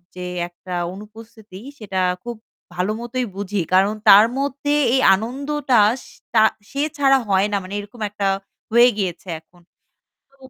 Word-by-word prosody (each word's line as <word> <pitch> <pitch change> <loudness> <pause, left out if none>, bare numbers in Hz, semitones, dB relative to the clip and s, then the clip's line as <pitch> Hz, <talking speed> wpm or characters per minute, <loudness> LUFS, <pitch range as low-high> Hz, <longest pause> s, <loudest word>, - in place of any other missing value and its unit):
যে 180 - -6 0.2
একটা 180 +1 -10 0.2
অনুপস্থিতি 215 -1 -13 0.2
সেটা 190 -3 -4 0.2
খুব 240 -1 -6 0.4
ভালোমতোই 230 +7 -2
বুঝি 200 0 -2
কারণ 195 +3 +4 0.2
তার 205 +2 +9
মধ্যে 280 +1 -1 0.2
এই 265 - +3
আনন্দটা 265 +3 -1 0.2
স - - -17 0.3
তা 220 - +5 0.3
সে 280 +1 -2 0.2
ছাড়া 270 -1 +4
হয় 195 +1 +3
না - - +2
মানে 185 +2 -9
এরকম 205 +3 -11
একটা 200 -1 -2 0.4
হয়ে 240 +2 +6
গিয়েছে 185 -3 -3
এখন। 175 +2 -26 0.7
তো 275 - -28
215 Hz, 145 wpm, -21 LUFS, 195-250 Hz, 0.7 s, তার